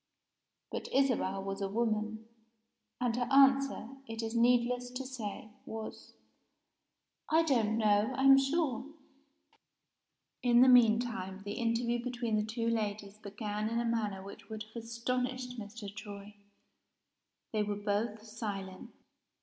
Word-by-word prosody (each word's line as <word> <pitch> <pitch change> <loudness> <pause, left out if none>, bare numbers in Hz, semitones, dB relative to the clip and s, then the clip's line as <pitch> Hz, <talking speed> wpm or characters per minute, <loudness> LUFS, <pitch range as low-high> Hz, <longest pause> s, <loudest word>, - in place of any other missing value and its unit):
But - - -4
Isabel 245 -8 +1
was 195 +1 -4
a 195 - -1
woman; 220 0 -1 0.7
and 245 -2 0
her 245 0 -1
answer, 275 -3 +4 0.2
it 225 0 -5
is 225 +1 -3
needless 245 +1 +3
to 250 +2 -5
say, 220 -4 -6
was 220 0 -8 1.2
"I 320 +1 +5
don't 225 -8 +2
know, 210 +1 +3
I'm 270 0 +8
sure." 275 -2 0 1.6
In 240 -1 +5
the 260 - +8
mean 230 -3 +7
time, 195 -5 -4
the 205 - -5
interview 235 +1 0
between 240 -3 -2
the 210 - +2
two 230 +2 -2
ladies 210 -2 -2
began 210 +1 -3
in 230 +1 0
a 235 - -1
manner 210 -4 -1
which 200 +3 -11
would 215 -1 -5
have 230 - -6
astonished 250 +2 -2
Mr. 205 -1 -8
Troy 205 -1 -9 1.2
they 215 - +1
were 205 0 -1
both 210 +2 -2
silent. 205 -4 -6
225 Hz, 135 wpm, -32 LUFS, 210-245 Hz, 1.6 s, I'm